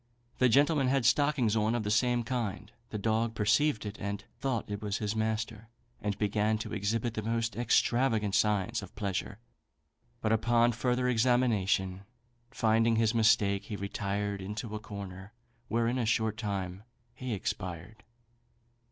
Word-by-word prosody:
The 130 - +5
gentleman 140 +2 +4
had 135 -2 +2
stockings 130 -4 +3
on 110 +1 +2
of 120 - -1
the 105 - -1
same 120 +2 +2
kind. 115 -3 -3 0.2
The 105 - -4
dog 110 +2 0
perceived 110 +4 +2
it, 105 0 -6
and 100 0 -3 0.2
thought 130 -5 -1
it 100 +1 -4
was 105 -1 -2
his 105 0 -2
master, 110 0 -2 0.3
and 105 -1 -2
began 105 +1 +1
to 110 - -6
exhibit 110 +3 -1
the 110 - -3
most 115 +1 -1
extravagant 115 -2 +2
signs 105 -2 +1
of 95 - -11
pleasure; 100 0 -3 0.8
but 110 - 0
upon 120 +2 +3
further 125 +1 0
examination 110 -6 +2 0.5
finding 115 -2 +2
his 110 0 +2
mistake, 105 -3 +3
he 105 - -5
retired 100 0 -3
into 105 +3 -5
a 110 - -3
corner, 100 -1 -8 0.3
where 115 +1 +1
in 125 +2 0
a 120 - 0
short 110 -2 +1
time 100 -4 -4 0.3
he 125 -2 -4
expired." 95 +3 -5
110 Hz, 150 wpm, -30 LUFS, 100-120 Hz, 0.8 s, The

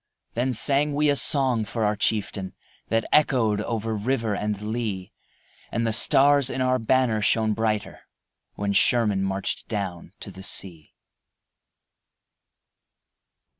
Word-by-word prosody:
Then 125 +2 -1
sang 140 +5 +3
we 150 0 +2
a - - +1
song 130 -3 +4
for 110 +2 -4
our 105 0 +1
chieftain 100 -2 -2 0.3
That 115 +1 0
echoed 120 -8 +2
over 115 0 -3
river 115 -1 -1
and 105 -1 -3
lea, 105 -3 -4 0.6
And 115 0 -1
the 110 - 0
stars 140 +3 +3
in - - -4
our 130 0 +1
banner 115 -2 +1
shown 110 +1 +1
brighter 110 -1 -3 0.5
When 100 0 -2
Sherman 105 -2 +2
marched 95 0 -3
down 95 -6 -5
to - - -9
the 95 - -12
sea. 85 -5 -4
110 Hz, 130 wpm, -24 LUFS, 105-130 Hz, 0.6 s, song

